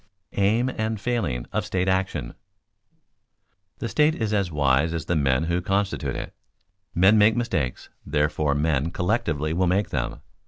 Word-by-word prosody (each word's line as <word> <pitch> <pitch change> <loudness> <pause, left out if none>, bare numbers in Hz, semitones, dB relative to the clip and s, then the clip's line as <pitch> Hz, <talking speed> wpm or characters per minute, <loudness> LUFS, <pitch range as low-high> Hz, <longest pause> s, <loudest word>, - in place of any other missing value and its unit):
[Sidenote: 100 - 0
Aim 120 +5 +2
and 110 -1 -1
failings 95 - -2
of - - 0
state 95 0 -1
action] 95 -10 -1 1.4
The - - -4
state 150 +8 +3
is 110 -2 -2
as 100 -4 0
wise 75 +2 +2
as 80 0 -4
the 85 - 0
men 65 -2 +2
who 85 +2 0
constitute 100 +2 -1
it. - - -6 0.6
Men 100 +5 +5
make 105 +2 +5
mistakes, 85 - -2
therefore 75 0 0
men 75 0 +1
collectively 85 -5 -1
will 90 +2 +1
make 95 +1 +1
them. - - -2
90 Hz, 155 wpm, -24 LUFS, 75-105 Hz, 1.4 s, Men